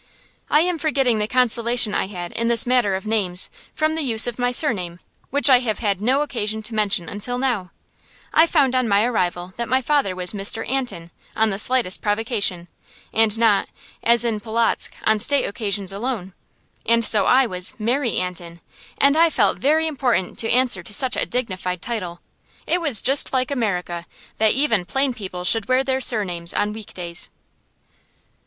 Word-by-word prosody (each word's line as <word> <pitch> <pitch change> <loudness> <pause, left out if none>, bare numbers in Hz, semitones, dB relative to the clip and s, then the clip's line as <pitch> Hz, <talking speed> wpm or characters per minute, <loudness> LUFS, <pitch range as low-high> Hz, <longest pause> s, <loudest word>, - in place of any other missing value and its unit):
I 300 - +4
am 350 -1 -1
forgetting 270 -7 +1
the 210 - -1
consolation 235 -2 +2
I - - -1
had, 175 -3 -7
in 230 - -2
this 235 -1 +4
matter 245 -6 +2
of 190 - -6
names, 195 -5 0 0.2
from 310 0 -1
the 320 - -2
use 230 -6 +3
of 245 0 -4
my 245 0 +1
surname, 190 - 0 0.3
which 285 +1 +4
I 260 -3 +7
have 225 -4 -2
had 200 -4 -2
no 265 +6 +1
occasion 220 -6 -3
to 225 - -6
mention 200 -5 0
until 215 +6 -4
now. 240 -8 -2 0.6
I 320 +1 +5
found 280 -6 +2
on 255 -2 +1
my 200 0 +2
arrival 180 -6 -2
that 235 0 -4
my 260 - +3
father 265 -8 0
was 180 +1 -1
"Mr. 205 +2 -1
Antin" 245 -10 -4 0.2
on 220 0 +2
the 195 - -3
slightest 245 -5 +2
provocation, 205 -5 0 0.5
and 225 -1 +2
not, 220 -3 +2 0.3
as 235 +1 +3
in 225 -3 -1
Polotzk, 225 +2 0
on 220 0 +2
state 285 +6 +3
occasions 200 -2 -2
alone. 205 -3 -4 0.5
And 230 0 +2
so 210 - +4
I 265 +1 +4
was 180 -5 -2
"Mary 240 +2 -1
Antin," 175 -2 -5 0.4
and 280 +1 +3
I 330 +1 +4
felt - - +1
very 310 +4 +2
important 255 - -1
to 225 - 0
answer 245 -6 +2
to 175 - -6
such 260 +2 +4
a - - -1
dignified 185 -7 -3
title. 185 -8 -5 0.4
It 355 - 0
was 285 -10 +1
just 270 +2 +2
like 255 +1 0
America 180 -9 -3 0.3
that 220 -1 +3
even 245 -9 +1
plain 270 +7 0
people 185 -6 -7
should 220 +4 +1
wear 255 +1 +2
their 265 0 -1
surnames 180 -9 0
on 210 0 -1
week 220 -1 -10
days. 170 -2 -3
225 Hz, 180 wpm, -21 LUFS, 195-255 Hz, 0.6 s, I